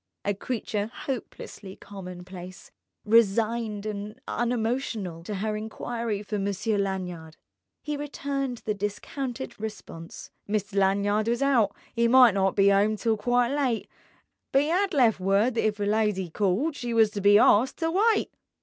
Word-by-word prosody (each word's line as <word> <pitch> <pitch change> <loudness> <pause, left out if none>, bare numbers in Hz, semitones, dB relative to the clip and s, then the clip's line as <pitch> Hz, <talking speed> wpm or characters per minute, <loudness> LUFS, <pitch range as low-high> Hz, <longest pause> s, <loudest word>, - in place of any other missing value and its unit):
A 205 - +1
creature 210 -1 -3
hopelessly 220 -7 -7
commonplace, 180 -1 -10 0.3
resigned, 220 0 +2
and 210 +2 -5
unemotional, 230 -7 -2
to 210 - -4
her 215 +2 -2
enquiry 220 0 -4
for 210 0 -3
Monsieur 200 +2 -1
Lanyard 180 -5 -4 0.5
he 300 -1 -3
returned 275 -3 -4
the 215 - 0
discounted 235 +6 -5
response: 205 -6 -8 0.2
Mister 205 -1 -1
Lanyard 200 +2 +2
was 235 +2 0
hout, 250 -7 +3 0.2
'e 235 0 +3
might 250 -2 +7
not 195 -1 +1
be 200 0 +5
'ome 205 +2 +3
till 225 +1 0
quite 245 +3 +1
lite, 260 -6 0 0.6
but 275 +1 +4
'ad 365 +5 +1
left 235 -7 +4
word 200 +6 +2
that 225 - +1
if 210 -1 -2
a 205 - 0
lidy 205 -4 0
called 210 - 0
she 240 -3 -3
was 220 -2 +5
to 205 -2 -4
be 205 +1 +7
awsked 240 +1 +4
to 325 0 -1
wite. 425 +4 +2
215 Hz, 150 wpm, -26 LUFS, 200-245 Hz, 0.6 s, might